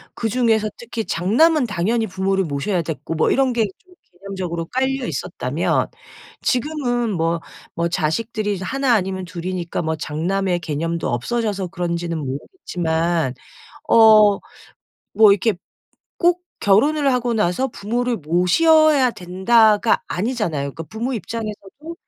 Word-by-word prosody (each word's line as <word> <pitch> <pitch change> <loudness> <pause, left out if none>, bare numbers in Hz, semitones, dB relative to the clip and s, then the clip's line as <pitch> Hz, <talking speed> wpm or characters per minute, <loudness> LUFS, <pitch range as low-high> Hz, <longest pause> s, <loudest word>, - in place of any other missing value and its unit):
그 225 - -2
중에서 225 -2 +2
특히 235 -1 -5
장남은 250 - +2
당연히 220 +4 0
부모를 190 +1 0
모셔야 160 +5 -1
됐고 160 0 -5
뭐 155 - +2
이런 265 -2 +2
게 225 -2 +2
좀 370 -1 -24 0.3
개념적으로 185 -4 -4
깔려 265 +3 -1
있었다면 - - -1 0.5
지금은 245 -4 -1
뭐 165 -1 0 0.4
뭐 170 0 0
자식들이 205 +5 -1
1 265 +5 0
아니면 190 -2 -2
2 175 -1 -8
이니까 175 -2 -3
뭐 160 0 -1
장남의 175 +4 -1
개념도 165 +2 -2
없어져서 200 - -2
그런지는 170 -1 -3
모르겠지만 160 - -2 0.5
어 215 -2 +7 0.8
뭐 215 -2 +7
이렇게 205 +1 +1 0.6
'꼭 350 0 +2 0.2
결혼을 275 +8 +3
하고 245 -1 0
나서 210 +5 +1
부모를 235 +3 -2
모셔야 265 - +4
된다.'가 210 +5 +3
아니잖아요. 190 - -2
그러니까 165 - -6
부모 240 +4 -3
입장에서도 225 - -6
205 Hz, 295 characters per minute, -20 LUFS, 170-240 Hz, 0.8 s, 어